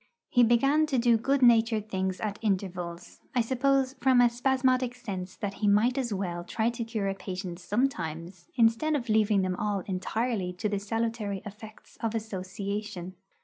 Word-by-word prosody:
He 245 - +5
began 275 +7 +4
to 275 -4 0
do 235 -1 +4
good 270 +4 +1
natured 225 -3 +4
things 190 -2 -2
at 210 -2 -3
intervals; 180 -4 -3 0.2
I 245 - +4
suppose 265 +2 +1
from 260 -2 +5
a 240 -1 +5
spasmodic 255 0 +1
sense 190 -6 -6
that 200 -1 -4
he 210 - +2
might 215 +5 +4
as 255 -4 -2
well 180 -3 -3
try 220 +6 0
to 235 0 -4
cure 220 -3 -2
a 195 - 0
patient 185 -2 -6
sometimes, 175 - -2
instead 235 +6 +3
of 250 -4 -3
leaving 215 -2 +3
them 185 -1 -1
all 205 -2 -1
entirely 195 0 -2
to 185 +4 -2
the 205 -1 -1
salutary 215 -2 -2
effects 215 +1 -12
of 225 0 -1
association. 200 -2 -4
215 Hz, 170 wpm, -28 LUFS, 190-240 Hz, 0.2 s, He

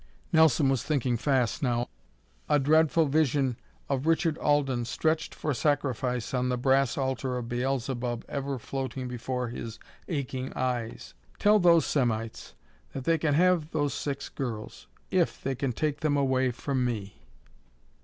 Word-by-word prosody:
Nelson 160 -3 +5
was 135 -3 +2
thinking 130 -5 0
fast 130 +1 +1
now, 120 -3 0 0.6
a 150 - +5
dreadful 155 +3 +4
vision 140 -3 +2 0.3
of 140 +2 -1
Richard 165 -1 +2
Alden 135 -5 +1
stretched 160 +6 -1
for 150 - -1
sacrifice 130 -3 0
on 125 0 +1
the 125 - 0
brass 135 0 +2
altar 130 -1 -1
of 120 -1 -4
Beelzebub 125 -1 -2
ever 140 -1 -3
floating 130 +1 -4
before 125 0 -3
his 115 -1 -6 0.3
aching 130 -5 -3
eyes. 125 -3 -3 0.2
"Tell 210 +1 +5
those 170 -3 +5
Semites 115 -5 -1 0.4
that 135 - -5
they 165 +3 +2
can 150 -2 +1
have 175 -2 +3
those 145 -3 0
six 140 -1 -3
girls 115 -6 -6 0.2
if - - +1
they 135 - -2
can 130 0 -1
take 145 +4 -1
them 145 -1 +1
away 130 -2 +2
from 130 +1 -2
me." 105 -5 -4
135 Hz, 145 wpm, -28 LUFS, 125-145 Hz, 0.6 s, Nelson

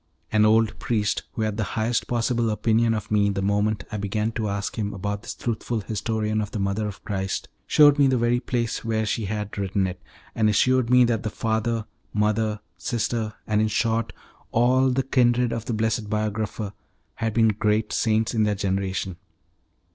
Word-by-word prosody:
An 105 -1 +4
old 110 0 +3
priest, 105 -3 0
who 110 - -2
had 105 -1 -1
the 110 - 0
highest 115 +2 0
possible 120 -1 +1
opinion 110 +2 +2
of 105 - -5
me 105 -1 +3
the 100 -1 -2
moment 105 +1 +1
I 105 - -3
began 105 +2 -1
to 110 -2 -2
ask 100 +1 -3
him 105 -2 -3
about 100 +1 -3
this - - -7
truthful 115 -1 -2
historian 110 +1 -1
of 105 - -4
the - - -5
mother 100 +2 -1
of 100 - -8
Christ, 95 -1 -3 0.2
shewed 145 -1 +6
me 140 - +6
the 130 -1 +2
very 120 +1 +2
place 120 -2 -2
where 110 -1 0
she 110 +1 -1
had 105 0 -4
written 95 0 0
it, 90 -1 -5 0.3
and 110 -1 +2
assured 125 +3 +3
me 125 0 +6
that 115 -2 +1
the 110 - -2
father, 110 +1 -1 0.3
mother, 105 0 +1 0.2
sister, 110 +2 -2
and 105 0 +1
in 110 - +2
short 115 +1 0 0.4
all 130 +3 +3
the 130 +1 +1
kindred 125 -2 +2
of 115 -1 -4
the 120 - -2
blessed 110 -1 -1
biographer, 105 -1 -2 0.4
had 115 -1 -2
been 115 -1 +5
great 105 +1 0
saints 110 0 +1
in 110 - +1
their 105 -1 +2
generation. 95 -2 -2
110 Hz, 185 wpm, -24 LUFS, 105-115 Hz, 0.4 s, shewed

